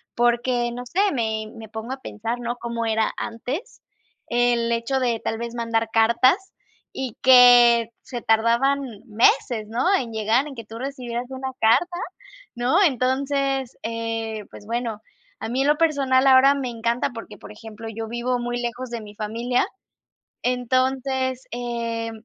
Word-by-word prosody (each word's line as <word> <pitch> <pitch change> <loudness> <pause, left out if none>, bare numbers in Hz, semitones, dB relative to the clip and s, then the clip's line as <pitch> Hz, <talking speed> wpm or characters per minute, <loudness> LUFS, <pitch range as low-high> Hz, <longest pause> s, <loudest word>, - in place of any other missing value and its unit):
porque 240 0 +1
no 245 +1 -6
sé. 355 +10 -3
Me 220 -3 -1
me 220 -2 -10
pongo 225 +4 -5
a 265 - -9
pensar, 230 +3 -4
¿no? 240 0 -3
Cómo 235 -1 -3
era 220 -1 +1
antes, 255 - -5 0.5
el 240 -1 +1
hecho 235 +3 0
de 235 -3 0
tal 225 - -2
vez 235 0 -5
mandar 230 -1 -1
cartas, 245 - +3 0.4
y 260 -4 -5
que 245 -2 +7
se 240 -3 -7
tardaban 235 +5 +3 0.3
meses, 220 0 +2
¿no?, 235 +7 -1
en 240 -8 -2
llegar, 220 +6 +1
en 275 - -9
que 230 - -7
tú 225 +1 -9
recibieras 250 -3 -4
una 265 0 -5
carta, 260 +11 +3 0.6
¿no? 255 +11 +2
Entonces, 270 -1 0
eh, 225 -2 -3
pues, 205 - -13
bueno, 230 -1 -3 0.4
a - - -4
mí 255 +3 0
en 275 - +1
lo 295 0 +3
personal, 275 -5 +2
ahora 270 +2 +7
me 265 -3 -3
encanta, 235 +2 -1
porque 225 -3 -9
por - - -12
ejemplo, 225 +1 -10
yo 225 0 -5
vivo 240 +2 -1
muy 240 0 -3
lejos 240 +1 -4
de 235 -1 -4
mi 210 -1 -11
familia, 230 +4 -1 0.8
entonces, 260 +1 0
eh, 235 -1 -3
240 Hz, 155 wpm, -23 LUFS, 230-260 Hz, 0.8 s, que